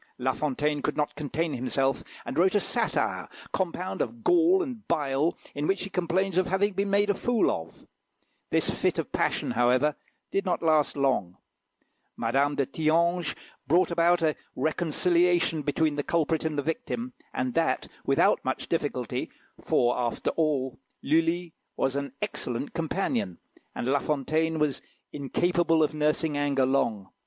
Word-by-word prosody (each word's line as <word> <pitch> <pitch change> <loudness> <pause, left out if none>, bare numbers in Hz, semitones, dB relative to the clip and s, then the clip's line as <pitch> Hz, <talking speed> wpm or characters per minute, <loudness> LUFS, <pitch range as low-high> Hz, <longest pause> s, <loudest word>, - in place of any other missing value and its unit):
La 130 +1 0
Fontaine 150 +1 -1
could 150 - -2
not 150 -1 0
contain 155 +2 -2
himself, 135 +1 0 0.2
and - - -5
wrote 185 +5 +3
a - - +5
satire, - - -1 0.3
compound 185 0 -2
of 235 -1 -4
gall 355 +2 +4
and 245 - -7
bile, 150 -1 +1 0.2
in 145 +1 -2
which 195 -1 +1
he 195 - -6
complains 185 +1 +1
of 185 - +1
having 195 +2 +1
been 200 +2 -1
made 205 +1 +3
a - - +1
fool 235 +3 +1
of. 80 0 -6 0.6
This - - +2
fit - - 0
of - - -3
passion, - - 0
however, 125 +5 +3 0.4
did 195 - +1
not 180 -3 -1
last 155 -3 +3
long. 130 -10 0 0.8
Madame 135 +5 +1
de 140 - +1
Thianges 165 +3 +1 0.3
brought 175 +5 +3
about 170 0 +3
a 155 -2 +2 0.2
reconciliation 175 +1 +2
between 150 +1 0
the 145 - 0
culprit 160 0 0
and 155 -2 -1
the 145 - 0
victim, 240 - -3 0.2
and 130 -1 -2
that 165 - +1 0.2
without - - +3
much - - -2
difficulty, - - -2 0.3
for, 120 0 +2
after 120 -1 -1
all, 140 -6 0 0.2
Lulli 165 +2 +1 0.2
was 135 0 0
an 140 -2 -3
excellent 125 +3 -3
companion, 170 - -1 0.4
and - - -3
La 140 +2 +3
Fontaine 155 +3 0
was 150 -3 0 0.3
incapable 165 +3 +2
of 155 - 0
nursing 150 0 +1
anger 140 -2 +2
long. 110 -7 0
155 Hz, 155 wpm, -27 LUFS, 140-175 Hz, 0.8 s, a